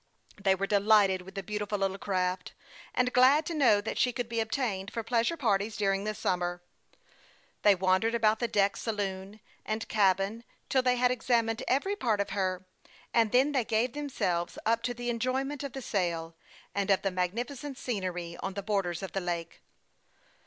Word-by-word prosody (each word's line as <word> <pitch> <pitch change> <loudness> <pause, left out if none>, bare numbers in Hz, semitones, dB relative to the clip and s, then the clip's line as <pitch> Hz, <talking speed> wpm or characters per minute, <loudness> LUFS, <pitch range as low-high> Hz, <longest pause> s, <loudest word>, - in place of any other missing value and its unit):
They 190 -1 +3
were 195 +1 -1
delighted 200 -2 +4
with 190 +2 -13
the 195 - -4
beautiful 210 +1 -3
little 195 0 -1
craft, 185 -2 -1 0.4
and 250 0 +1
glad 270 +5 +5
to 340 - -3
know 245 -9 +4
that 215 - -4
she 250 - +3
could 245 -1 -3
be 230 0 -2
obtained 220 -4 -2
for 230 - -3
pleasure 235 +8 +1
parties 210 -5 0
during 195 -1 +1
the 215 0 -2
summer. 175 -3 -1 1.0
They 205 -1 +6
wandered 190 +5 +2
about 220 -1 +3
the 240 - 0
deck, 200 -2 +2
sa - - -4
loon, 200 0 -4 0.2
and 220 +1 -3
cabin 200 +2 +2 0.3
till 260 - +3
they 250 -1 +2
had 250 0 +3
examined 230 -2 +1
every 385 +10 +1
part 225 - 0
of 200 0 -1
her, 185 -2 -1 0.5
and 225 -2 +3
then 265 +4 +4
they 265 -4 +1
gave 225 +3 0
themselves 185 -12 -2
up 230 +1 +2
to 245 - -4
the 240 0 -2
enjoyment 260 +4 -1
of 275 -3 -5
the 270 - -6
sail, 170 -6 -2 0.4
and 200 0 -1
of 195 -2 +3
the 195 - 0
magnificent 240 +10 -3
scenery 180 -8 -3
on 190 0 -4
the 200 - -4
borders 195 -4 -1
of 190 - -5
the 195 - -2
lake. 170 -2 -4
210 Hz, 185 wpm, -29 LUFS, 190-240 Hz, 1.0 s, They